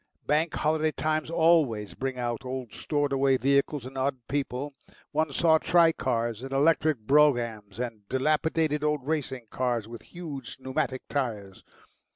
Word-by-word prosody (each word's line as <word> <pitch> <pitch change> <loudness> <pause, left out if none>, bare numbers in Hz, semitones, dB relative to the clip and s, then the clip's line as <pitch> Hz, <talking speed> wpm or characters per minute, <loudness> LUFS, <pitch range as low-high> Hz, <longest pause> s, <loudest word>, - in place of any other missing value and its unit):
Bank 155 +2 +1
Holiday 155 0 +1
times 155 0 -1
always 160 -11 +2
bring 130 -1 -4
out 120 -1 -3
old 130 -2 -5
stored 145 -2 -1
away 135 -1 +3
vehicles 140 0 +1
and 130 +1 -6
odd 130 0 0
people; 140 0 -3 0.4
one 155 0 0
saw 160 +2 +4
tricars 125 -11 +2
and 135 +1 -7
electric 150 +1 +3
broughams 115 -5 +2
and 115 -5 -5
dilapidated 150 +2 +1
old 150 -3 0
racing 135 -5 -2
motors 120 -4 -1
with 115 0 -9
huge 150 -8 -8
pneumatic 130 0 -2
tyres. 105 -9 -3
135 Hz, 140 wpm, -27 LUFS, 125-155 Hz, 0.4 s, saw